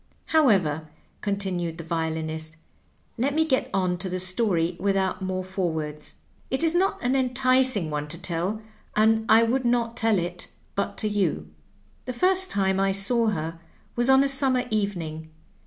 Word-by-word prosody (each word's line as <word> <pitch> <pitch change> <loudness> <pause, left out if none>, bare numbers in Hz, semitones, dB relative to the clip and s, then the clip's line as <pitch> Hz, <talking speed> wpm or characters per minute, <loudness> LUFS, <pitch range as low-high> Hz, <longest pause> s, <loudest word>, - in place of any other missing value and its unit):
However," 185 - +3 0.3
con 200 -1 0
tinued 175 -4 -3
the 165 - -6
violinist, 160 -1 -3 0.3
" - - -39
let 275 +4 0
me 320 0 +3
get 265 -5 0
on 180 -2 0
to 185 - -2
the 185 - -2
stoiy 180 -2 +1
without 195 -1 0
more 185 0 -2
forewords. 160 -5 -4 0.3
It 265 +5 -1
is 325 0 +3
not 375 +3 +2
an 250 +2 +1
enticing 255 - +2
one 150 0 -3
to 165 +3 -5
tell, 185 +6 -3 0.3
and 220 +1 +3
I 225 +1 +7
would 250 +3 +1
not 235 -1 +1
tell 225 -3 +2
it 175 0 -3 0.3
but 200 - -2
to 215 - 0
you. 180 - -1 0.3
" 100 0 -35
The 255 - -2
first 375 +7 +2
time 190 - +1
I 195 0 +2
saw 225 +4 +2
her 165 -5 -2 0.4
was 240 +2 +2
on 265 +1 +6
a - - +2
summer 265 -2 +2
evening. 170 -7 -2
195 Hz, 170 wpm, -25 LUFS, 170-245 Hz, 0.4 s, I